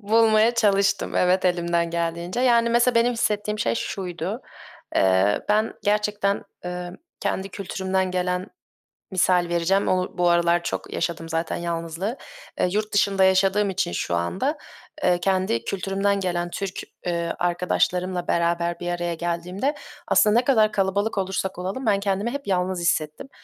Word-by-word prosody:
Bulmaya 220 Hz, +2 st, +4 dB
çalıştım, 200 Hz, -3 st, +2 dB
evet, 180 Hz, +1 st, +3 dB
elimden 170 Hz, -1 st, +1 dB
geldiğince. 170 Hz, +4 st, -2 dB
Yani, 235 Hz, -2 st, +4 dB
mesela, 240 Hz, +1 st, +3 dB
benim 235 Hz, +1 st, +3 dB
hissettiğim 210 Hz, -2 st, -1 dB
şey 225 Hz, -, +1 dB
şuydu. 185 Hz, +1 st, -4 dB, 0.5 s
Eee, 95 Hz, +2 st, +3 dB
ben 215 Hz, +2 st, +2 dB
gerçekten, 210 Hz, -1 st, 0 dB, 0.2 s
eee, 180 Hz, 0 st, -5 dB, 0.3 s
kendi 190 Hz, +1 st, -2 dB
kültürümden 190 Hz, -1 st, -2 dB
gelen, 180 Hz, 0 st, -1 dB, 0.7 s
misal 180 Hz, -1 st, +3 dB
vereceğim, 175 Hz, +4 st, +1 dB
o 185 Hz, -1 st, 0 dB
bu 175 Hz, 0 st, +3 dB
aralar 170 Hz, 0 st, +3 dB
çok -, -, -4 dB
yaşadım 165 Hz, -1 st, -3 dB
zaten 165 Hz, +1 st, -1 dB
yalnızlığı. 170 Hz, -, -3 dB, 0.4 s
Eee, -, -, +2 dB
yurt 210 Hz, +2 st, -2 dB
dışında 200 Hz, -1 st, +3 dB
yaşadığım 195 Hz, +2 st, +3 dB
için 190 Hz, -, -1 dB
şu 85 Hz, 0 st, -2 dB
anda, 190 Hz, -, -1 dB, 0.5 s
eee, 180 Hz, -1 st, +3 dB
kendi 185 Hz, -11 st, 0 dB
kültürümden 195 Hz, +1 st, 0 dB
gelen 175 Hz, -2 st, -2 dB
Türk, 195 Hz, +1 st, -4 dB, 0.3 s
eee, 170 Hz, -1 st, -1 dB
arkadaşlarımla 180 Hz, 0 st, 0 dB
beraber 170 Hz, 0 st, 0 dB
bir 175 Hz, -, -4 dB
araya 175 Hz, -1 st, -2 dB
geldiğimde 175 Hz, -, -2 dB, 0.3 s
aslında 215 Hz, +2 st, +4 dB
ne 250 Hz, -, -2 dB
kadar 220 Hz, -6 st, +4 dB
kalabalık 200 Hz, +2 st, 0 dB
olursak 190 Hz, -1 st, -2 dB
olalım, 195 Hz, +9 st, -4 dB
ben 205 Hz, -3 st, +3 dB
kendimi 200 Hz, +3 st, -1 dB
hep 280 Hz, -3 st, -6 dB
yalnız 185 Hz, -1 st, 0 dB
hissettim. 160 Hz, -, -1 dB
185 Hz, 145 wpm, -24 LUFS, 175-205 Hz, 0.7 s, Bulmaya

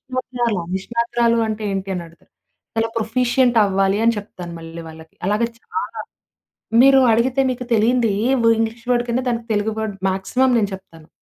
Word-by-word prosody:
"నిష్ణాతురాలా! 240 Hz, -6 st, -1 dB
నిష్ణాతురాలు 235 Hz, +3 st, 0 dB
అంటే 215 Hz, 0 st, -4 dB
ఏంటి?" 195 Hz, 0 st, -4 dB
అనడుగుతారు. 170 Hz, -1 st, -10 dB, 0.4 s
చాలా 225 Hz, 0 st, 0 dB
ప్రొఫిషియంట్ 245 Hz, +2 st, +2 dB
అవ్వాలి 195 Hz, 0 st, +1 dB
అని 230 Hz, 0 st, +3 dB
చెప్తాను 180 Hz, -4 st, -8 dB
మళ్ళీ 165 Hz, 0 st, -9 dB
వాళ్ళకి. 160 Hz, 0 st, -14 dB
అలాగే 210 Hz, +3 st, +1 dB
చాలా. 440 Hz, -, -5 dB, 0.8 s
మీరు 270 Hz, +1 st, +7 dB
అడిగితే 250 Hz, +4 st, +2 dB
మీకు 250 Hz, 0 st, -5 dB
తెలియంది 230 Hz, +1 st, +3 dB, 0.2 s
ఏ -, -, +1 dB
వ -, -, +4 dB
ఇంగ్లీష్ 225 Hz, +1 st, -2 dB
వర్డ్ 240 Hz, -1 st, +2 dB
కింద 235 Hz, +2 st, +1 dB
దానికి 235 Hz, -1 st, -2 dB
తెలుగు 210 Hz, +1 st, 0 dB
వర్డ్ 220 Hz, -2 st, -3 dB
మాక్సిమం 195 Hz, +8 st, +1 dB
నేను 205 Hz, -3 st, +1 dB
చెప్తాను. 165 Hz, -4 st, -12 dB
225 Hz, 155 wpm, -20 LUFS, 195-240 Hz, 0.8 s, మీరు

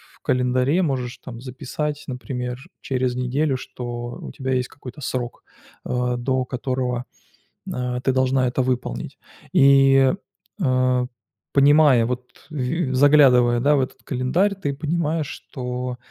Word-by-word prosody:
в -, -, -28 dB
календаре 125 Hz, +6 st, +2 dB
можешь 130 Hz, -5 st, -2 dB
там 120 Hz, -2 st, -10 dB
записать, 145 Hz, +3 st, -4 dB
например, 125 Hz, -1 st, -4 dB, 0.2 s
через 130 Hz, -2 st, -1 dB
неделю, 130 Hz, +3 st, 0 dB
что 120 Hz, -1 st, -6 dB
у -, -, -7 dB
тебя 130 Hz, -1 st, -3 dB
есть 125 Hz, 0 st, 0 dB
какой-то 130 Hz, +1 st, -11 dB
срок, 125 Hz, -2 st, -4 dB, 0.4 s
э, 125 Hz, 0 st, 0 dB
до 130 Hz, +1 st, 0 dB
которого, 125 Hz, -1 st, -2 dB, 0.7 s
а, 125 Hz, 0 st, -2 dB
ты 130 Hz, -, +2 dB
должна 130 Hz, 0 st, +2 dB
это 130 Hz, -, 0 dB
выполнить. 125 Hz, -, -3 dB, 0.4 s
И, 135 Hz, -1 st, +6 dB, 0.5 s
э, 130 Hz, -3 st, +2 dB, 0.5 s
понимая, 140 Hz, -3 st, +6 dB
вот 125 Hz, +1 st, -3 dB, 0.2 s
в 155 Hz, -, -10 dB
и 140 Hz, +2 st, -1 dB
заглядывая, 130 Hz, -3 st, +5 dB
да, 145 Hz, +3 st, +4 dB
в 135 Hz, -, +3 dB
этот 130 Hz, -, -5 dB
календарь, 150 Hz, +11 st, +1 dB
ты 175 Hz, -8 st, -3 dB
понимаешь, 155 Hz, +1 st, -1 dB
что 125 Hz, -2 st, -5 dB
130 Hz, 135 wpm, -22 LUFS, 125-140 Hz, 0.7 s, И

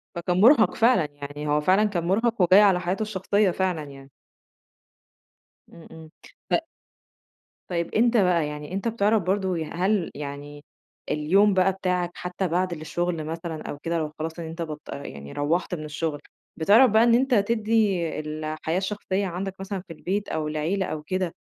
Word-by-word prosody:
فكان 175 Hz, +2 st, 0 dB
مرهق 225 Hz, -4 st, +6 dB
فعلًا، 225 Hz, -7 st, +4 dB
يعني 145 Hz, +1 st, -7 dB
هو 150 Hz, 0 st, +2 dB
فعلًا 185 Hz, +7 st, +3 dB
كان 200 Hz, -5 st, -1 dB
مرهق 225 Hz, +3 st, +1 dB
وجاي 185 Hz, +3 st, +7 dB
على 195 Hz, -3 st, +5 dB
حياته 180 Hz, +4 st, -2 dB
الشخصية 200 Hz, -1 st, +1 dB
فعلًا 180 Hz, -4 st, -1 dB
يعني. 135 Hz, -1 st, -12 dB, 1.6 s
إمم، 165 Hz, -, -14 dB
إمم. 160 Hz, -1 st, -12 dB, 0.4 s
ط -, -, +3 dB, 1.1 s
طيب 170 Hz, -2 st, -2 dB
أنت 235 Hz, +2 st, +3 dB
بقى 180 Hz, -6 st, +3 dB
يعني 150 Hz, +3 st, -7 dB
أنت 195 Hz, +4 st, -2 dB
بتعرف 215 Hz, -2 st, +2 dB
برضه، 190 Hz, 0 st, 0 dB
هل 185 Hz, +3 st, 0 dB
يعني 145 Hz, 0 st, -8 dB, 0.5 s
اليوم 195 Hz, +8 st, +3 dB
بقى 190 Hz, 0 st, +3 dB
بتاعك 180 Hz, -2 st, -1 dB
حتى 180 Hz, +1 st, -3 dB
بعد 180 Hz, +2 st, 0 dB
الشغل 165 Hz, +1 st, -3 dB
مثلًا 165 Hz, 0 st, -5 dB
أو -, -, -5 dB
كده 170 Hz, +2 st, -2 dB
لو 155 Hz, -2 st, -2 dB
خلاص 160 Hz, +2 st, -4 dB
إن 170 Hz, -, -5 dB
انت 165 Hz, +1 st, -7 dB
بطل 150 Hz, -3 st, -6 dB
يعني 70 Hz, 0 st, -9 dB
روّحت 165 Hz, +5 st, -1 dB
من 155 Hz, -2 st, -7 dB
الشغل، 150 Hz, 0 st, -3 dB, 0.4 s
بتعرف 210 Hz, +9 st, +5 dB
بقى 220 Hz, +2 st, +5 dB
إن 235 Hz, 0 st, +5 dB
أنت 260 Hz, +2 st, +2 dB
تدي 220 Hz, -1 st, +2 dB, 0.2 s
الحياة 155 Hz, +2 st, -3 dB
الشخصية 195 Hz, 0 st, -2 dB
عندك 185 Hz, +2 st, -4 dB
مثلًا 195 Hz, 0 st, -4 dB
في 165 Hz, -, -8 dB
البيت 195 Hz, +5 st, -3 dB
أو 155 Hz, -1 st, -2 dB
العيلة 160 Hz, +6 st, -1 dB
أو 155 Hz, -3 st, -4 dB
كده 185 Hz, +1 st, -2 dB
180 Hz, 165 wpm, -25 LUFS, 155-200 Hz, 1.6 s, وجاي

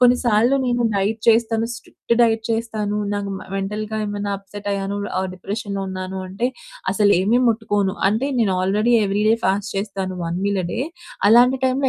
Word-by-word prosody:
కొన్నిసార్లు 245 Hz, 0 st, +4 dB
నేను 240 Hz, -1 st, +1 dB
డైట్ 205 Hz, +3 st, 0 dB
చేస్తాను. 225 Hz, 0 st, +3 dB
స్ట్రిక్ట్ 235 Hz, 0 st, -3 dB
డైట్ 225 Hz, -1 st, +3 dB
చేస్తాను. 220 Hz, -2 st, -1 dB, 0.2 s
నాకు 200 Hz, -1 st, -3 dB
మ -, -, -11 dB
మెంటల్‌గా 210 Hz, +2 st, -3 dB
ఏమన్నా 205 Hz, 0 st, -3 dB
అప్సెట్ 205 Hz, +1 st, -8 dB
అయ్యాను, 200 Hz, 0 st, -2 dB, 0.2 s
ఆహ్, 190 Hz, 0 st, -1 dB
డిప్రెషన్‌లో 200 Hz, +1 st, -4 dB
ఉన్నాను 185 Hz, 0 st, -5 dB
అంటే 200 Hz, +7 st, -1 dB, 0.4 s
అసలేమీ 205 Hz, +3 st, +3 dB
ముట్టుకోను. 205 Hz, -3 st, 0 dB
అంటే 225 Hz, +7 st, 0 dB
నేను 200 Hz, -4 st, +2 dB
ఆల్రెడీ 210 Hz, +5 st, +2 dB
ఎవ్రీ 200 Hz, +1 st, 0 dB
డే 225 Hz, -, +5 dB
ఫాస్ట్ 195 Hz, +2 st, 0 dB
చేస్తాను. 195 Hz, -2 st, -3 dB
1 170 Hz, +2 st, -2 dB
మీల్ 200 Hz, -2 st, +1 dB
ఎ -, -, -2 dB
డే. -, -, -2 dB, 0.5 s
అలాంటి 245 Hz, +4 st, +6 dB
టైమ్‌లో 260 Hz, +1 st, +2 dB
210 Hz, 160 wpm, -21 LUFS, 195-230 Hz, 0.5 s, అలాంటి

